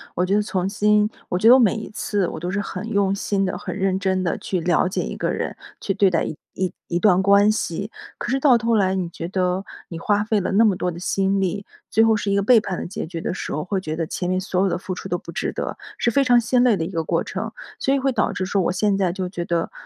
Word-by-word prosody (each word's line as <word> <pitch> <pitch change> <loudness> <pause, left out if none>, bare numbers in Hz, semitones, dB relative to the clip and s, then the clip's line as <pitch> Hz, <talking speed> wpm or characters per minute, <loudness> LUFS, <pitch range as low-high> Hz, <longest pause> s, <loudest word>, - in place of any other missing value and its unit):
我 180 - +1
觉 195 +2 +1
得 210 - +3
从 190 -3 -2
新 210 +1 +2 0.2
我 180 - 0
觉 220 - +4
得 240 - +10
我 - - +5
每 225 -5 +4
一 220 - -6
次， 205 -3 -1
我 - - -6
都 175 +3 -3
是 205 - -1
很 205 +2 -5
用 200 -3 +1
心 200 -1 0
地、 185 - -2
很 - - -6
认 190 -1 0
真 190 -1 0
地 170 - -1
去 185 - -2
了 175 +1 +2
解 185 - -2
一 - - -5
个 - - -1
人， - - -3 0.2
去 195 - -1
对 195 -1 +4
待 170 -3 +1
一 - - -4 0.2
一 185 -1 -2
一 170 - -1
段 190 -2 +4
关 200 +1 +5
系。 200 -1 -3 0.3
可 - - -4
是 270 - +1
到 265 -3 +5
头 230 0 +1
来 190 -3 +2
你 185 -2 -1
觉 170 0 -6
得， 185 0 0 0.2
你 165 - -7
花 205 +4 +1
费 215 -1 +1
了 - - -2
那 220 +4 +5
么 205 -4 +3
多 180 0 -2
的 170 - -8
心 195 +2 0
力， 195 +2 -2 0.2
最 225 - +4
后 225 -1 +4
是 205 -1 -2
一 - - +2
个 200 - +2
背 235 +2 +6
叛 190 -4 -4
的 - - -4
结 200 +5 -5
局 165 0 -6
的 - - -2
时 - - -5
候， 150 - -2
会 195 +1 -2
觉 155 -4 -4
得 165 0 -2
前 180 +3 -3
面 185 0 +1
所 185 -1 -1
有 195 - +2
的 175 - -1
付 185 +1 -5
出 - - -7
都 175 - -1
不 170 - -10
值 205 +7 -2
得， - - -4 0.2
是 240 - +1
非 280 +3 +3
常 245 -2 +5
心 245 +1 +2
累 245 -4 +4
的 165 - -2
一 160 - -5
个 165 -1 -1
过 165 - 0
程， 220 +3 -5 0.3
所 270 - +1
以 275 - +2
会 270 0 +1
导 250 - +1
致 185 - -2
说 195 +1 0
我 175 - +1
现 200 +1 +1
在 190 -3 +1
就 185 -1 -3
觉 175 -2 -4
得， 170 -1 -1
195 Hz, 315 characters per minute, -22 LUFS, 180-210 Hz, 0.3 s, 得